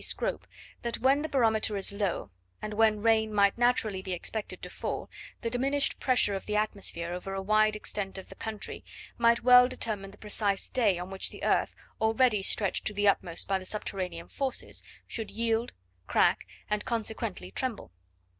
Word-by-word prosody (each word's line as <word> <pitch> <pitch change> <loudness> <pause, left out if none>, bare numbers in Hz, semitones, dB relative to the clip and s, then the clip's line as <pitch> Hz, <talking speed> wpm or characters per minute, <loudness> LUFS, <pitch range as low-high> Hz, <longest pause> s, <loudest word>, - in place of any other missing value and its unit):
Scrope, - - -1 0.3
that 235 -1 -2
when 270 +4 +3
the 315 - -3
barometer 220 -5 +2
is 195 +1 +1
low, 200 - -2 0.3
and 215 - -5
when 215 -1 +3
rain 220 -1 +3
might 200 -1 +4
naturally 235 -5 +2
be 190 -1 -4
expected 205 +4 -4
to - - -5
fall, - - -4 0.3
the 230 - -1
diminished 275 +3 +2
pressure 250 -6 +2
of 195 - -5
the 210 - -1
atmosphere 195 -5 -1
over 195 +2 -5
a 195 - -2
wide 215 +1 +3
extent 205 -2 -4
of 190 0 -9
country, 220 -2 -5 0.4
might 235 0 +4
well 250 0 +8
determine 210 -6 -2
the 200 - -15
precise 205 -2 -1
day 215 -8 +2
on 180 +2 -6
which 195 - -3
the - - -11
earth, - - +2 0.3
already 220 -1 +3
stretched 195 0 +1
to 210 - 0
the 205 0 +2
utmost 175 -4 +1
by 195 -1 +1
the - - -9
subterranean 185 -4 -3
forces, 270 -2 -2 0.2
should 225 -2 -5
yield, 230 +1 0 0.4
crack, - - +3 0.2
and 210 0 -1
consequently 225 -3 -3
tremble. 255 - -3
215 Hz, 175 wpm, -29 LUFS, 195-230 Hz, 0.4 s, well